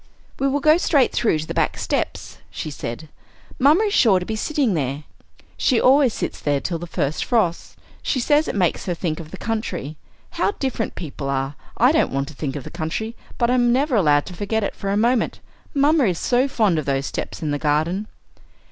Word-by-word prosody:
"We 275 - +2
will 280 +1 0
go 310 +2 +6
straight 290 -6 +3
through 215 -9 +1
to 155 - -4
the - - -5
back - - 0
steps," - - -3
she 155 - -6
said. 140 +2 -6 0.5
"Mamma 300 +10 +5
is 415 -2 0
sure 200 - +5
to 180 - -6
be 220 - -3
sitting 270 -1 0
there; 140 -2 -2 0.5
she 250 -4 +2
always 265 -1 +5
sits - - -4
there 145 -1 0
till 170 +3 -3
the 175 - -7
first 150 -2 -1
frost; 205 -9 0 0.2
she 265 - -1
says 295 +5 +3
it - - -3
makes 180 -2 0
her 175 - 0
think 165 -2 -3
of 160 -2 -8
the 190 - -8
country. 180 - -4 0.3
How - - 0
different 260 - -3
people 140 -4 -5
are! 135 0 -1 0.2
I 250 +4 +5
don't 315 - +2
want 135 +1 -1
to - - -11
think 140 -1 -4
of 145 - -5
the - - -9
country, 175 +8 -4 0.2
but 235 0 +2
I'm 245 -1 +3
never 270 +2 +2
allowed 150 -8 +3
to - - -8
forget 205 +4 -1
it - - -3
for 195 - -4
a 200 - +1
moment. 235 +1 +1 0.4
Mamma 285 0 +4
is 180 -5 +1
so 250 +6 +2
fond 215 - +2
of 150 - -4
those 135 0 0
steps - - -5
and 150 -2 -1
the 145 - -1
garden." 160 +8 0
200 Hz, 215 wpm, -22 LUFS, 155-255 Hz, 0.5 s, go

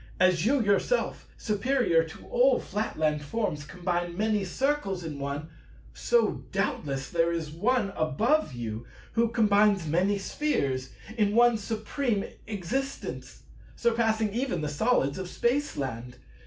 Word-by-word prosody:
As 185 0 +4
you 280 +3 +3
yourself, 205 - +1
superior 210 -5 +2
to 160 -1 -11
all 250 +1 +3
Flatland 155 -7 -1
forms, 150 -2 -2
combine 175 +1 -2
many 215 -1 +1
Circles 195 -3 -1
in 150 -3 -5
One, 140 +3 -4 0.4
so 475 -1 +1
doubtless 135 -2 -1
there 170 0 +2
is 165 -3 -3
One 210 +5 +1
above 205 - +1
you 115 -2 -5 0.2
who 230 0 +2
combines 210 -4 +3
many 180 +6 +2
Spheres 140 - -1 0.3
in 205 0 +2
One 240 0 +6
Supreme 220 +1 -2 0.2
Existence, 225 +7 -4 0.3
surpassing 225 -3 +1
even 240 - -1
the 150 - -2
Solids 150 - +1
of 185 -1 -5
Spaceland. 135 - -1
200 Hz, 125 wpm, -28 LUFS, 155-235 Hz, 0.4 s, One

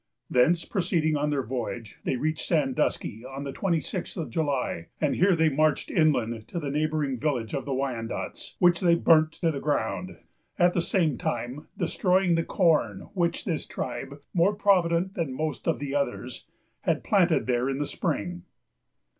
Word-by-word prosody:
Thence, 165 +7 +3
proceeding 170 -5 0
on 150 0 0
their 140 -2 0
voyage, 120 -3 -5
they - - +1
reached 155 +4 -2
Sandusky 135 -7 0
on 135 +2 -7
the 140 - -4
twenty 170 +1 0
sixth 180 +5 -5
of 165 - -4
July; 140 - -1
and 150 - +1
here 185 0 +4
they 160 -1 +3
marched 155 +1 +1
inland 120 - +1
to 175 - -4
the 145 -3 -3
neighboring 150 -3 0
village 125 -7 -1
of 135 - -2
the 140 - -2
Wyandots, 125 -4 -4
which 175 -1 +4
they 170 -2 +4
burnt 160 -2 +4
to 165 -1 0
the 140 - -4
ground, 155 +5 -2 0.4
at 175 0 +4
the 175 - +1
same 165 -6 +1
time 120 +5 -3
destroying 185 -1 +2
the 165 0 +2
corn, 155 - +1
which 170 -3 0
this 165 -5 -2
tribe, 140 +2 -5
more 185 +4 +3
provident 185 -2 +2
than 160 -9 -2
most 155 +4 -3
of 165 - +2
the 140 -1 -4
others, 130 -3 -3 0.3
had - - 0
planted - - +3
there 125 +1 +1
in 135 - -1
the 145 - -1
spring. 90 -9 -3
150 Hz, 170 wpm, -27 LUFS, 130-170 Hz, 0.4 s, here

